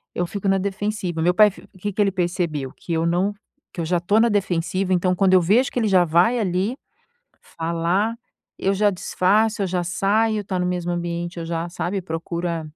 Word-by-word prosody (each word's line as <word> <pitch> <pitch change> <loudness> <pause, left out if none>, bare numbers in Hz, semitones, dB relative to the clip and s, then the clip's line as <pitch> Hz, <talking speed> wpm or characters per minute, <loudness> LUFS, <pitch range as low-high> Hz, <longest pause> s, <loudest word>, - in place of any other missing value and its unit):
eu 175 0 -1
fico 200 +1 -4
na 195 - +3
defensiva. 200 -3 -3
Meu 175 +2 +3
pai 210 +1 +6
fi - - -16
que 205 +1 -3
que 210 - 0
ele 195 -1 +3
percebeu, 175 -7 -2
que 170 - -6
eu 165 0 +1
não 180 +4 +1 0.4
que 170 - -3
eu - - -2
já 175 +2 +1
estou 200 +6 +2
na 235 +1 +4
defensiva, 185 -1 0
então 180 +1 +2
quando 190 0 +3
eu 185 - +6
vejo 225 +10 +3
que 245 - -1
ele 220 - +1
já 185 -3 +4
vai 175 +9 +3
ali 195 +4 0 0.7
falar, 170 +7 -1 0.4
eu 195 +1 +1
já 205 +1 +3
desfaço, 205 +4 +1
eu - - +1
já 180 0 -1
saio, 205 +4 +1
tá 185 -1 -2
no 180 - 0
mesmo 175 -1 -2
ambiente, 170 0 -4
já, 165 0 -3
sabe, 175 +3 -3
procura 170 0 -3
180 Hz, 200 wpm, -22 LUFS, 170-205 Hz, 0.7 s, pai